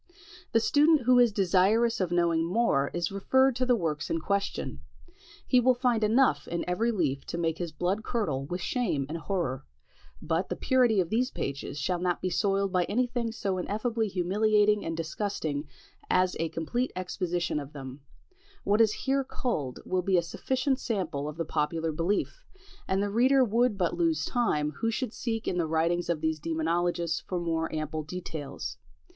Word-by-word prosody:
The 225 Hz, -, +4 dB
student 300 Hz, +5 st, +4 dB
who 250 Hz, +1 st, +5 dB
is 240 Hz, -2 st, +5 dB
desirous 200 Hz, +4 st, +2 dB
of 185 Hz, -, 0 dB
knowing 170 Hz, -2 st, +2 dB
more 170 Hz, -7 st, +1 dB
is 175 Hz, 0 st, -2 dB
referred 260 Hz, +6 st, +3 dB
to 255 Hz, 0 st, 0 dB
the 250 Hz, -, +5 dB
works 155 Hz, -7 st, -2 dB
in 165 Hz, -, 0 dB
question; 200 Hz, +4 st, -2 dB, 0.7 s
he 255 Hz, -, +4 dB
will 250 Hz, +1 st, +4 dB
find 245 Hz, -3 st, +1 dB
enough 215 Hz, -, +3 dB
in 170 Hz, 0 st, -3 dB
every 220 Hz, +7 st, +1 dB
leaf 145 Hz, -, -1 dB
to -, -, -5 dB
make 165 Hz, -1 st, -1 dB
his 175 Hz, -2 st, -3 dB
blood 185 Hz, +7 st, -1 dB
curdle 155 Hz, -, -1 dB
with 180 Hz, +3 st, -4 dB
shame 180 Hz, -, -1 dB
and 165 Hz, +3 st, -4 dB
horror: 160 Hz, -6 st, -2 dB, 0.6 s
but 165 Hz, -, -1 dB
the -, -, -2 dB
purity 245 Hz, -5 st, +3 dB
of 175 Hz, -, -4 dB
these 250 Hz, +3 st, +1 dB
pages 140 Hz, -, -4 dB
shall 175 Hz, +5 st, -1 dB
not 180 Hz, 0 st, 0 dB
be 185 Hz, -, -2 dB
soiled 195 Hz, -1 st, +1 dB
by 180 Hz, -2 st, +2 dB
any 250 Hz, +5 st, +1 dB
thing 240 Hz, -2 st, -3 dB
so 195 Hz, -4 st, -2 dB
ineffably 220 Hz, +4 st, -1 dB
humiliating 210 Hz, +3 st, +2 dB
and 165 Hz, 0 st, -3 dB
disgusting 160 Hz, -3 st, -3 dB, 0.4 s
as 185 Hz, 0 st, +2 dB
a 165 Hz, 0 st, 0 dB
complete 165 Hz, +11 st, -2 dB
exposition 180 Hz, -3 st, -2 dB
of 140 Hz, -1 st, -8 dB
them; 135 Hz, -1 st, -8 dB, 0.6 s
what 205 Hz, +3 st, +3 dB
is 220 Hz, -2 st, +5 dB
here 275 Hz, 0 st, +2 dB
culled 155 Hz, -, -3 dB
will 185 Hz, 0 st, 0 dB
be 185 Hz, 0 st, +2 dB
a 170 Hz, -, +2 dB
sufficient 260 Hz, -, -1 dB
sample 165 Hz, -, -2 dB
of 150 Hz, -, -9 dB
the 165 Hz, -, -2 dB
popular 160 Hz, +1 st, -1 dB
belief, 185 Hz, -, -1 dB, 0.4 s
and 195 Hz, +1 st, +1 dB
the 205 Hz, -, -2 dB
reader 260 Hz, +5 st, +4 dB
would 235 Hz, 0 st, +2 dB
but 175 Hz, -3 st, +1 dB
lose 330 Hz, -2 st, +1 dB
time 150 Hz, -, 0 dB
who 230 Hz, -, 0 dB
should 235 Hz, 0 st, -2 dB
seek 225 Hz, -2 st, -3 dB
in 180 Hz, -, 0 dB
the 165 Hz, -, +1 dB
writings 165 Hz, +2 st, 0 dB
of 165 Hz, -3 st, 0 dB
the 160 Hz, 0 st, +1 dB
demonologists 165 Hz, +1 st, 0 dB
for 180 Hz, -, -3 dB
more 165 Hz, -1 st, -1 dB
ample 155 Hz, 0 st, -3 dB
details. 155 Hz, -2 st, -6 dB
185 Hz, 180 wpm, -28 LUFS, 165-230 Hz, 0.7 s, who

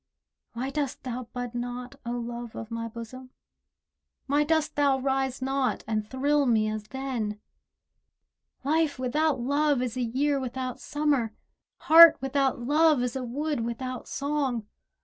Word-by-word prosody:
Why 255 Hz, +3 st, -3 dB
dost 285 Hz, -2 st, -3 dB
thou 250 Hz, -1 st, -5 dB
bud 245 Hz, -1 st, -5 dB
not, 245 Hz, +1 st, -5 dB
O 240 Hz, -, -1 dB
Love 240 Hz, -1 st, -5 dB
of 225 Hz, 0 st, -7 dB
my 230 Hz, 0 st, -3 dB
bosom? 235 Hz, +3 st, -9 dB, 1.0 s
Why 285 Hz, +2 st, +2 dB
dost 315 Hz, 0 st, 0 dB
thou 280 Hz, -2 st, +3 dB
rise 265 Hz, -1 st, -1 dB
not, 270 Hz, 0 st, 0 dB
and 215 Hz, -1 st, -2 dB
thrill 285 Hz, +2 st, +1 dB
me 220 Hz, -3 st, +3 dB
as 215 Hz, -1 st, -4 dB
then? 235 Hz, -4 st, -4 dB, 1.2 s
Life 305 Hz, 0 st, +1 dB
without 275 Hz, +3 st, +1 dB
love 285 Hz, +2 st, +2 dB
is 245 Hz, -2 st, -3 dB
a 255 Hz, -, -2 dB
year 275 Hz, +4 st, +1 dB
without 255 Hz, -1 st, -4 dB
Summer, 285 Hz, -7 st, 0 dB, 0.5 s
Heart 325 Hz, 0 st, +9 dB
without 270 Hz, 0 st, 0 dB
love 295 Hz, +1 st, +3 dB
is 250 Hz, +1 st, -2 dB
a 265 Hz, -, -2 dB
wood 290 Hz, +4 st, -2 dB
without 235 Hz, +2 st, -4 dB
song. 275 Hz, -5 st, -2 dB
260 Hz, 145 wpm, -27 LUFS, 240-285 Hz, 1.2 s, Heart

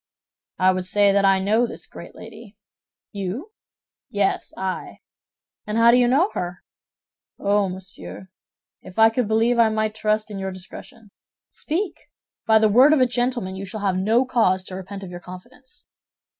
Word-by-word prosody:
"I 185 Hz, 0 st, +4 dB
would 185 Hz, -1 st, -3 dB
say 205 Hz, +1 st, +3 dB
that 200 Hz, 0 st, +2 dB
I 195 Hz, 0 st, +5 dB
know 215 Hz, +5 st, +1 dB
this -, -, -9 dB
great -, -, -12 dB
lady." 220 Hz, -2 st, -13 dB, 0.5 s
"You?" 205 Hz, -, -5 dB, 0.6 s
"Yes; 200 Hz, -1 st, -1 dB
I." 190 Hz, -1 st, -4 dB, 0.7 s
"And 210 Hz, +1 st, -2 dB
how 230 Hz, +1 st, +6 dB
do 245 Hz, -, +5 dB
you 245 Hz, -1 st, +4 dB
know 305 Hz, -, +3 dB
her?" 175 Hz, 0 st, -5 dB, 0.7 s
"Oh, 200 Hz, -1 st, +1 dB
monsieur, 185 Hz, 0 st, -8 dB, 0.5 s
if 180 Hz, -, -13 dB
I 225 Hz, 0 st, +6 dB
could 240 Hz, -1 st, -1 dB
believe 225 Hz, +2 st, +2 dB
I 230 Hz, -1 st, +5 dB
might 215 Hz, 0 st, -1 dB
trust 215 Hz, 0 st, -1 dB
in 200 Hz, -, -5 dB
your 190 Hz, 0 st, -3 dB
discretion." 200 Hz, +4 st, -12 dB, 0.4 s
"Speak! 350 Hz, +3 st, -4 dB, 0.4 s
By 220 Hz, 0 st, +6 dB
the 220 Hz, 0 st, +4 dB
word 255 Hz, +8 st, +6 dB
of 310 Hz, -, +3 dB
a 255 Hz, -, +5 dB
gentleman, 245 Hz, -5 st, -2 dB
you 190 Hz, -, -6 dB
shall 210 Hz, +3 st, -6 dB
have 195 Hz, -2 st, 0 dB
no 220 Hz, +7 st, +2 dB
cause 190 Hz, -7 st, +1 dB
to 185 Hz, -, -8 dB
repent 195 Hz, +1 st, -8 dB
of 180 Hz, -, -8 dB
your 175 Hz, -, -7 dB
confidence." 250 Hz, +11 st, -13 dB
215 Hz, 170 wpm, -22 LUFS, 190-240 Hz, 0.7 s, how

